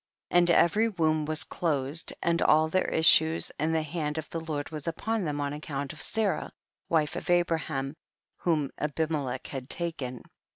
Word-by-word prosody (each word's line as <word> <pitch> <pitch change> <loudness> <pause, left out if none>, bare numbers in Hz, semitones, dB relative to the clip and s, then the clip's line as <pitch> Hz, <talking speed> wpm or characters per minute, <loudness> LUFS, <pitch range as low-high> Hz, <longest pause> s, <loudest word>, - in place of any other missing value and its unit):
17. - - +4
And 175 0 +3
every 215 +7 +3
womb 155 -6 0
w^as 155 0 +1
closed, 150 -1 -1
and 170 0 +1
all 155 +1 +4
their 185 +4 0
issues, 160 0 +5
and 155 +2 +1
the 160 - +1
hand 155 -1 -3
of 155 - -4
the 165 - -3
Lord 155 -3 -4
was 155 -1 -6
upon 215 +5 -1
them 145 -2 -2
on 145 0 -2
account 145 -2 -5
of 155 - -9
Sarah, 220 -3 0 0.4
wife 155 -3 +1
of - - -6
Abraham, 160 -5 0 0.4
whom 155 -5 0
Abimelech 150 -3 -2
had 135 -1 -6
taken. 140 -8 -3
155 Hz, 170 wpm, -28 LUFS, 145-170 Hz, 0.4 s, issues